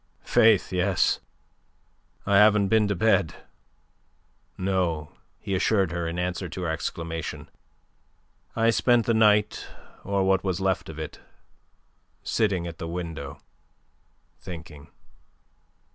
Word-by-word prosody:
"Faith, 110 -4 +4
yes. 90 0 +2 1.1
I 100 - +3
haven't 105 -1 +5
been 110 -1 +3
to 100 - 0
bed. 95 -3 +2 1.2
No," 90 -5 -1 0.3
he 100 - -4
assured 95 -1 +2
her, 85 -1 -2
in 85 +1 -4
answer 90 0 -2
to 90 - -6
her 85 - -1
exclamation. 80 0 -5 1.0
"I 115 0 +3
spent 120 -1 +3
the 115 - +2
night, 105 -1 +3 0.4
or 100 0 0
what 95 0 +2
was 95 -2 -1
left 95 -2 -1
of 80 - -8
it, 80 -1 -7 1.0
sitting 100 -6 0
at 85 -1 -7
the 85 - -5
window 80 -5 -6 1.0
thinking." 80 -4 -10
95 Hz, 115 wpm, -26 LUFS, 85-100 Hz, 1.2 s, haven't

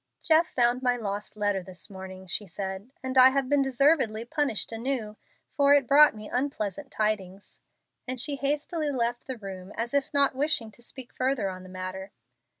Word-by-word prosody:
"Jeff 320 0 +3
found 245 0 +2
my 250 -1 +2
lost 210 -2 -5
letter 205 -2 0
this 185 -1 -10
morning," 190 -1 -9
she 200 +2 -1
said, 190 +4 -5
"and 260 0 +2
I 255 +1 +10
have 270 0 0
been 285 +1 +3
deservedly 270 -4 +2
punished 280 -6 0
anew, 225 -2 -2 0.4
for 285 -1 +4
it 280 -2 +3
brought 290 0 +6
me 215 0 -9
unpleasant 255 -1 -3
tidings;" 200 -4 -3 0.5
and 255 0 -3
she 285 +3 -2
hastily 295 +3 -1
left 240 -2 -1
the 260 -2 -5
room, 190 -2 -8
as 235 +2 -3
if 280 -1 +1
not 280 -1 +4
wishing 265 -5 0
to 240 - -19
speak 250 +1 -8
further 255 -6 0
on 185 0 -9
the 185 - -12
matter. 185 +1 -6
240 Hz, 180 wpm, -27 LUFS, 200-275 Hz, 0.5 s, I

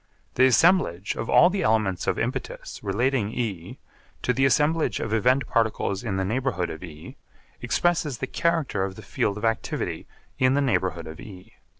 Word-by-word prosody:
The 130 +1 +5
assemblage 130 - +3
of 115 - -5
all 175 - +6
the 195 - -1
elements 105 -5 +1
of - - +1
impetus - - -4
relating 120 -2 0
E 100 -8 -4 0.5
to - - +1
the 135 - +2
assemblage 150 -3 +2
of 110 - -3
event 125 +5 +2
particles 110 -3 0
in 105 -5 -2
the 95 - 0
neighbourhood 115 -4 -1
of 80 - -8
E 75 -3 -10 0.4
expresses 165 -6 0
the 130 - -3
character 160 - 0
of 95 -1 -4
the 110 - -11
field 100 +1 -1
of 105 - -3
activity 115 0 -2 0.3
in 130 +1 +3
the - - +2
neighbourhood 95 -11 0
of 80 0 -9
E. 95 -3 -12
115 Hz, 175 wpm, -25 LUFS, 95-135 Hz, 0.5 s, all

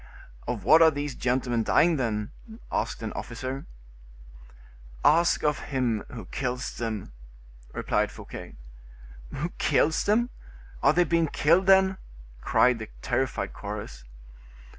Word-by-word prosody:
"Of 120 -5 -3
what 160 - +6
are 160 - +8
these 145 -2 -4
gentlemen 125 -1 0
dying, 165 +8 +3
then?" 105 -5 -2 0.4
asked - - -2
an 110 - -4
officer. 130 +3 -5 1.4
"Ask 170 +3 +4
of 150 -1 +1
him 125 -6 0
who 115 -6 -8
kills 125 +4 -4
them," 110 - -4 0.6
replied - - 0
Fouquet. - - -10 0.8
"Who 160 +6 -2
kills 160 +1 +2
them? 235 +4 +2 0.5
Are 140 - +5
they 175 +2 +4
being 170 -1 +1
killed, 170 +6 +2
then?" 190 0 +5 0.4
cried 125 -2 +3
the 110 - -7
terrified 130 +1 -1
chorus. - - -7
135 Hz, 120 wpm, -27 LUFS, 115-165 Hz, 1.4 s, are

